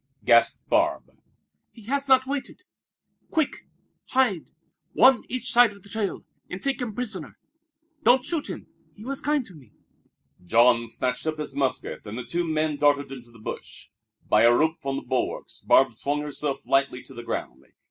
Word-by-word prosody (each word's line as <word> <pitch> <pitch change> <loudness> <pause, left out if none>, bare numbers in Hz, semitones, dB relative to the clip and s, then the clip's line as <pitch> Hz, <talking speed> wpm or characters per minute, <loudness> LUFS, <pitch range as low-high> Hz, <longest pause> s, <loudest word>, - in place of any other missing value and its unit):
gasped - - +4
Barbe. - - +1 0.6
"He 225 - -16
has 280 +5 -1
not 260 -1 +5
waited. 275 0 -5 0.7
Quick, 320 -3 -1 0.4
hide, 255 -10 +1 0.4
one 260 -1 +6
each 255 -1 -3
side 240 -3 +5
of 200 -2 -17
the 200 - -15
trail, 205 -2 -3 0.2
and 180 - -5
take 275 +2 -2
him 225 -4 -4
prisoner. 215 -9 -5 0.6
Don't 250 -2 +5
shoot 310 0 -2
him. - - -6 0.3
He 210 - -12
was 275 +1 -4
kind 295 -3 0
to 195 - -14
me." 135 -9 -17 0.7
Jean 115 +4 +4
snatched 125 +5 -2
up 155 0 -1
his 150 -3 -5
musket 135 -2 -2
and 105 +3 -6
the 125 - -5
two 170 +8 -2
men 155 -1 0
darted 145 -1 +2
into 125 -3 -10
the 115 - -17
bush. 110 - -8 0.4
By - - +4
a 115 - +7
rope 160 +6 +2
from 135 -2 -2
the - - -4
bulwarks 125 0 -3
Barbe 130 -3 +4
swung 145 +6 -2
herself 150 -1 -3
lightly 135 -2 +1
to 135 - -14
the 120 - -7
ground. 65 - -5
155 Hz, 175 wpm, -25 LUFS, -, 0.7 s, a